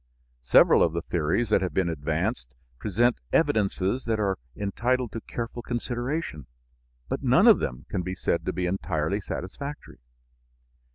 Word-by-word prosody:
Several 60 Hz, -, +6 dB
of 80 Hz, -, +3 dB
the 85 Hz, 0 st, -2 dB
theories 85 Hz, +8 st, 0 dB
that 105 Hz, -, +3 dB
have 90 Hz, -, -3 dB
been 95 Hz, -2 st, +2 dB
advanced 70 Hz, -5 st, -2 dB, 0.2 s
present 115 Hz, -, +1 dB
evidences 100 Hz, +3 st, +1 dB
that 110 Hz, -2 st, 0 dB
are 100 Hz, -3 st, 0 dB, 0.2 s
entitled 120 Hz, +4 st, 0 dB
to 115 Hz, -, -5 dB
careful 120 Hz, 0 st, -5 dB
consideration, 120 Hz, -, -3 dB, 0.6 s
but -, -, -3 dB
none -, -, +5 dB
of -, -, +8 dB
them 60 Hz, +1 st, -4 dB
can 95 Hz, -, -2 dB
be 95 Hz, +1 st, -4 dB
said -, -, -1 dB
to -, -, +2 dB
be 90 Hz, -, -2 dB
entirely 90 Hz, 0 st, -1 dB
satisfactory. 140 Hz, +11 st, -7 dB
100 Hz, 150 wpm, -26 LUFS, 85-120 Hz, 0.6 s, of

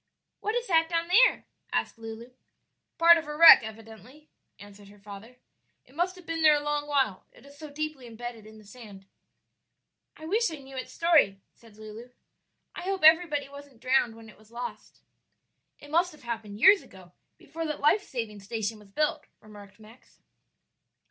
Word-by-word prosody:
"What 430 Hz, +2 st, -3 dB
is 485 Hz, 0 st, -2 dB
that 325 Hz, -5 st, +2 dB
down 335 Hz, 0 st, -2 dB
there?" 485 Hz, +8 st, +4 dB, 0.3 s
asked -, -, -3 dB
Lulu. 225 Hz, +2 st, -10 dB, 0.7 s
"Part 335 Hz, 0 st, +6 dB
of 315 Hz, -, -10 dB
a 300 Hz, 0 st, -6 dB
wreck, 330 Hz, -3 st, +10 dB
evidently," 225 Hz, +6 st, -13 dB, 0.3 s
answered 205 Hz, 0 st, -15 dB
her 205 Hz, +1 st, -17 dB
father; 205 Hz, +4 st, -13 dB, 0.5 s
"it 255 Hz, -, -23 dB
must 350 Hz, +4 st, -2 dB
have 365 Hz, -2 st, -16 dB
been 330 Hz, 0 st, -4 dB
there 310 Hz, -1 st, +6 dB
a 290 Hz, -, -3 dB
long 295 Hz, 0 st, -2 dB
while, 270 Hz, -10 st, -1 dB
it -, -, -20 dB
is 280 Hz, 0 st, -16 dB
so 305 Hz, +1 st, -11 dB
deeply 295 Hz, -3 st, -6 dB
imbedded 230 Hz, -1 st, -9 dB
in 220 Hz, 0 st, -15 dB
the 215 Hz, -, -16 dB
sand." 205 Hz, -3 st, -14 dB, 1.1 s
"I 315 Hz, -, -11 dB
wish 440 Hz, +8 st, 0 dB
I 320 Hz, -, -7 dB
knew 270 Hz, -2 st, -13 dB
its 260 Hz, -, -7 dB
story," 310 Hz, -, +2 dB
said 225 Hz, -3 st, -21 dB
Lulu; 215 Hz, +3 st, -11 dB, 0.6 s
"I -, -, -8 dB
hope 380 Hz, -1 st, -4 dB
everybody 315 Hz, -3 st, +4 dB
wasn't 280 Hz, -3 st, -14 dB
drowned 255 Hz, -2 st, +1 dB
when 225 Hz, 0 st, -14 dB
it 215 Hz, -, -17 dB
was 215 Hz, 0 st, -22 dB
lost." 240 Hz, +1 st, -9 dB, 0.8 s
"It 290 Hz, -, -15 dB
must 350 Hz, +3 st, +1 dB
have 305 Hz, -, -18 dB
happened 225 Hz, -3 st, -7 dB
years 390 Hz, -, +6 dB
ago, 185 Hz, -2 st, -17 dB, 0.3 s
before 330 Hz, 0 st, -7 dB
that 300 Hz, -, -5 dB
life 300 Hz, +8 st, +3 dB
saving 225 Hz, -, -6 dB
station 215 Hz, +1 st, -5 dB
was 210 Hz, -1 st, -19 dB
built," 300 Hz, +7 st, -2 dB
remarked 205 Hz, -1 st, -16 dB
Max. 220 Hz, +3 st, -19 dB
260 Hz, 180 wpm, -27 LUFS, 220-315 Hz, 1.1 s, wreck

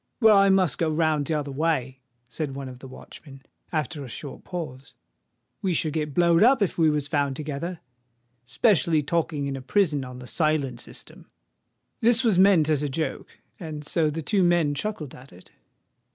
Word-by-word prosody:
"Well, 220 Hz, -3 st, +6 dB
I 195 Hz, 0 st, +5 dB
must 185 Hz, -7 st, +2 dB
go 165 Hz, -, +1 dB
round 155 Hz, -2 st, +1 dB
t'other 150 Hz, -3 st, -2 dB
way," 135 Hz, -3 st, -1 dB, 0.3 s
said 135 Hz, +3 st, -5 dB
one 135 Hz, -1 st, -6 dB
of 125 Hz, -1 st, -10 dB
the 135 Hz, -, -10 dB
watchmen, 135 Hz, +1 st, -13 dB, 0.3 s
after 155 Hz, -2 st, -3 dB
a 130 Hz, -, -9 dB
short 140 Hz, +3 st, -8 dB
pause: 155 Hz, -7 st, -7 dB, 0.7 s
"we 185 Hz, -3 st, 0 dB
should 155 Hz, -1 st, 0 dB
get 150 Hz, -3 st, -3 dB
blowed 170 Hz, -1 st, +4 dB
up 245 Hz, 0 st, +5 dB
if 190 Hz, -, -1 dB
we 160 Hz, -2 st, +3 dB
was 150 Hz, -1 st, -1 dB
found 145 Hz, -2 st, 0 dB
together—'specially 140 Hz, -, -2 dB
talking 160 Hz, -2 st, -1 dB
in 140 Hz, -1 st, -3 dB
a 135 Hz, -, -6 dB
prison 150 Hz, -1 st, +1 dB
on 125 Hz, -1 st, -9 dB
the 125 Hz, -, -10 dB
silent 145 Hz, -4 st, 0 dB
system." -, -, -6 dB, 0.7 s
This 235 Hz, +2 st, +3 dB
was 215 Hz, -6 st, +3 dB
meant 185 Hz, -5 st, +5 dB
as 155 Hz, -3 st, +1 dB
a 145 Hz, -, -1 dB
joke; 155 Hz, +4 st, -4 dB, 0.2 s
and 155 Hz, -4 st, -7 dB
so 155 Hz, +1 st, +1 dB
the 155 Hz, +2 st, -4 dB
two 200 Hz, +5 st, +1 dB
men 175 Hz, -4 st, +3 dB
chuckled 150 Hz, -3 st, -4 dB
at 130 Hz, +2 st, -14 dB
it. 90 Hz, +1 st, -17 dB
150 Hz, 180 wpm, -25 LUFS, 135-170 Hz, 0.7 s, Well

